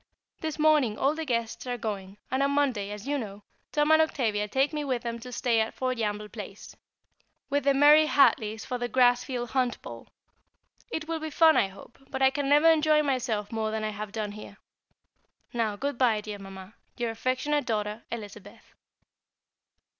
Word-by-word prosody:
This 315 -1 -4
morning 300 -8 +3
all 275 +2 +2
the 320 0 -4
guests 235 -2 -2
are 245 0 -2
going, 200 -3 -5
and 260 +1 +1
on 275 - +3
Monday, 265 -8 0
as 210 +3 -7
you 290 0 0
know, 205 -3 -8 0.3
Tom 295 +1 +2
and 315 0 +7
Octavia 220 -9 0
take 270 +8 +1
me 300 -1 -2
with 255 -4 -2
them 235 -1 -4
to 250 +2 -9
stay 235 -1 +1
at 220 - -3
Foljambe 220 -5 -2
Place, 205 -2 -9 0.8
with 285 0 0
the 280 -1 +4
Murray 300 +2 +7
Hartleys 220 -7 +3
for 250 -2 -4
the 245 0 -2
Grassfield 245 0 +2
Hunt 250 -1 0
Ball. - - -9 0.8
It 315 0 -4
will 330 -1 -2
be 315 0 -4
fun, 320 +1 +5
I - - +3
hope, 195 +4 -15
but 265 0 -2
I 265 - +6
can 280 0 -2
never 295 +3 +5
enjoy 310 -1 +4
myself 245 -7 -1
more 220 -1 -1
than 220 0 -3
I 215 - -1
have 210 0 -6
done 210 -1 -3
here. 210 -1 -11 1.0
Now, 225 -3 0
good 280 +4 -3
bye, 235 -5 +3
dear 210 -1 -7
Mamma, 195 0 -10 0.2
your 240 -2 -1
affectionate 255 +4 -1
daughter, 210 -1 -2
Elizabeth. 205 -3 -9
245 Hz, 185 wpm, -27 LUFS, 215-285 Hz, 1.0 s, and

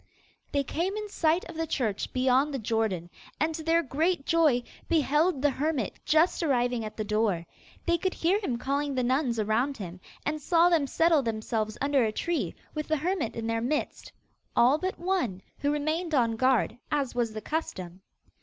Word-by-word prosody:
They 280 -1 +1
came 345 +8 -2
in 425 -1 -4
sight 335 -1 +1
of 340 - -9
the 325 0 -2
church 230 -10 -1
beyond 260 +3 +2
the 275 - -2
Jordan, 220 -7 -1 0.3
and, 310 +3 +1
to 320 - -5
their 330 +1 +3
great 315 +2 0
joy, 310 -7 +3 0.3
beheld 305 -1 +2
the 290 - +4
hermit 280 -4 -2
just 315 +4 +3
arriving 245 -6 +1
at 215 - -7
the 215 - -1
door. 210 -5 0 0.4
They 340 0 +2
could 375 +1 -1
hear 365 +5 +2
him 260 - -2
calling 280 +2 -1
the 255 - +1
nuns 255 -1 +1
around 225 +6 +1
him, 185 -3 -7 0.3
and 305 0 -1
saw 340 +3 +4
them 320 -5 +2
settle 325 +1 +3
themselves 220 -2 -2
under 280 -2 +3
a 220 - +1
tree, 335 +9 -2 0.2
with 305 -1 -3
the 315 - +1
hermit 330 - -1
in 230 - -4
their 230 0 0
midst 295 +6 -2 0.4
all 255 +6 +5
but 375 +2 -2
one, 345 - -1 0.2
who 285 - 0
remained 310 +3 -1
on 230 -4 +2
guard, 255 -1 +2
as 280 -4 0
was 235 -3 -1
the 215 - -4
custom. 185 - -4
280 Hz, 185 wpm, -28 LUFS, 230-325 Hz, 0.4 s, all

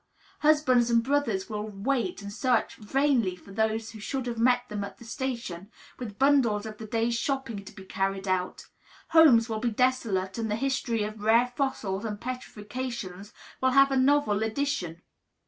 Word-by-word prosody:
Husbands 290 -6 +4
and 230 -1 +3
brothers 255 -8 0
will 210 -2 -4
wait 210 -1 -2
and 200 0 -7
search 245 0 +1
vainly 240 -3 +1
for 190 +2 -15
those 220 +1 -1
who 220 - -11
should 260 +4 -3
have 235 -2 -4
met 245 +1 +3
them 205 -2 -4
at 200 - -8
the 235 - -13
station, 230 -7 -4 0.3
with 215 -5 -7
bundles 260 -7 +3
of 215 -1 -8
the 220 - -7
day's 230 +2 0
shopping 235 -4 -2
to - - -11
be 190 - -12
carried 195 +1 -2
out; 185 -1 -1 0.4
homes 270 -9 +6
will 220 -2 -3
be 240 +2 0
desolate; 225 -5 0
and 225 -1 -2
the 210 - 0
history 250 -3 -1
of 215 0 -6
rare 230 +3 +3
fossils 215 -8 -2
and 210 -2 -4
petrifactions 225 -4 -6 0.3
will 260 - +4
have 275 0 +6
a - - +1
novel 260 -5 +3
addition. 220 - -2
230 Hz, 175 wpm, -27 LUFS, 205-255 Hz, 0.4 s, homes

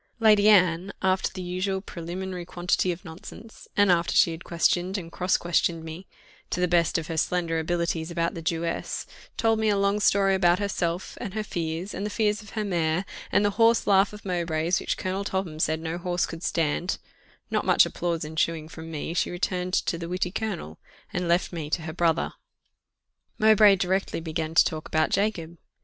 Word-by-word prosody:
Lady 215 -2 +6
Anne, 180 -2 +4
after 190 0 +2
the 185 -1 -6
usual 185 +2 -2
preliminary 180 0 -6
quantity 175 +1 0
of 175 +3 -7
nonsense, 185 +7 -11
and 205 -2 +5
after 170 -1 +1
she 170 - +5
had 165 0 -7
questioned 175 +3 +1
and 170 -3 -7
cross 180 +2 +1
questioned 170 -1 0
me, 160 +4 -8 0.4
to - - -2
the 180 - +2
best 170 -1 +2
of 165 - -3
her 165 0 -5
slender 165 0 0
abilities, 170 0 -1
about 170 -1 -1
the 165 - -6
Jewess, 165 +1 -2 0.3
told 225 -2 +2
me 220 -1 +2
a 205 - +2
long 200 +1 +2
story 195 -1 +3
about 175 -2 +4
herself, 185 -3 -2
and 200 - -5
her 215 - -1
fears, 170 0 -4
and 195 - -4
the 210 - -2
fears 210 0 0
of 210 +1 -13
her 215 - 0
mare, 170 -1 0 0.3
and 205 - +3
a 205 - +2
horse 230 +2 +3
laugh 195 0 +4
of 210 0 -12
Mowbray's 170 -1 0
which - - -2
Colonel 190 +2 -2
Topham 190 -5 -3
said 160 0 +1
no 165 +1 -4
horse 175 -1 0
could 165 - -8
stand: 165 +1 0 0.5
not - - +1
much - - +5
applause 170 -2 -2
ensuing 160 0 -1
from 160 0 -9
me, 160 +1 -4
she 175 - 0
returned 180 0 -2
to 170 - 0
the 170 0 -5
witty 180 0 -1
colonel, 195 - -4 0.3
and 180 0 -1
left 170 +2 +1
me 160 -3 -4
to 160 - -1
her 160 -1 -5
brother. 165 -1 +1 1.0
Mowbray 215 -2 +6
directly 190 0 -1
began 160 0 -4
to - - +7
talk 155 -1 -3
about 155 0 +1
Jacob. 175 -5 -1
175 Hz, 195 wpm, -26 LUFS, 165-195 Hz, 1.0 s, to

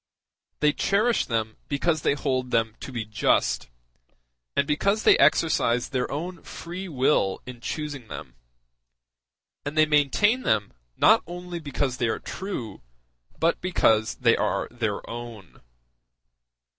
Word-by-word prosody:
They 150 -1 +4
cherish 215 +8 +1
them 110 -2 -2
because 155 +2 0
they 140 - +2
hold 130 -3 -1
them 115 -2 +1
to - - -8
be 120 -3 -4
just, 85 - +1 0.9
and 140 - +2
because 200 +9 +1
they - - +7
exercised 140 -5 +3
their 130 -2 -1
own 170 +6 -5
free 180 +3 -7
will 130 - +1
in 125 -2 -9
choosing 145 -3 -5
them; 70 - -8 1.3
and 145 +2 -5
they 155 - +6
maintain 155 - +3
them 105 - 0 0.2
not - - +6
only 175 0 -6
because 140 -4 -2
they 120 - +1
are 110 - 0
true, 185 - -6 0.6
but 165 +1 +1
because 110 -12 +2
they 115 -2 +3
are - - -1
their 110 -4 -3
own. 115 -5 -9
140 Hz, 130 wpm, -25 LUFS, 115-165 Hz, 1.3 s, they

